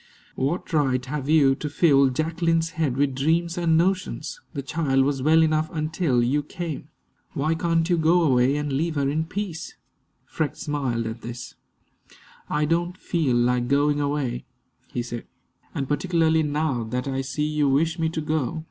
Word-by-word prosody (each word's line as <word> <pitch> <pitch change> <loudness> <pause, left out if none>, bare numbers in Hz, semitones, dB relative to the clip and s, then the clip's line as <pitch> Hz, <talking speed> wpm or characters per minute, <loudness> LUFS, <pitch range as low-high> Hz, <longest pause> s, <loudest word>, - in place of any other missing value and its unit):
"What 150 +7 -2
right 130 -4 +1
have 140 +1 -4
you 145 -4 +5
to 150 +2 -4
fill 140 -3 +4
Jacqueline's 165 +3 0
head 155 -7 -1
with 140 -1 +2
dreams 165 +5 +1
and 165 -2 +2
notions? 190 - -1
The 140 - -3
child 135 -2 +1
was 140 -1 -1
well 160 +3 +5
enough 155 0 +1
until 155 -5 0
you 140 +5 +1
came. 155 -1 -6 0.5
Why 155 +1 0
can't 165 0 +1
you 175 -2 +2
go 170 +2 +4
away 130 -2 +3
and 150 -1 -2
leave 160 +4 -1
her 140 -1 +1
in 155 +3 0
peace?" 185 -2 -5 0.5
Freke 155 -4 -2
smiled 130 -6 -2
at 115 +1 -5
this. 120 +1 -7 1.0
"I 150 0 +1
don't 175 +3 0
feel 155 -10 0
like 120 0 +2
going 145 +2 +2
away," 140 -4 -2 0.5
he 120 - -2
said, 120 -1 -7 0.5
"and 135 - -2
particularly 160 +1 +2
now 150 -4 -1
that 125 +4 -3
I 135 0 -1
see 135 +3 -2
you 150 -2 +1
wish 160 +5 +1
me 160 0 +1
to 160 0 -3
go. 155 -1 -1
150 Hz, 170 wpm, -24 LUFS, 135-165 Hz, 1.0 s, you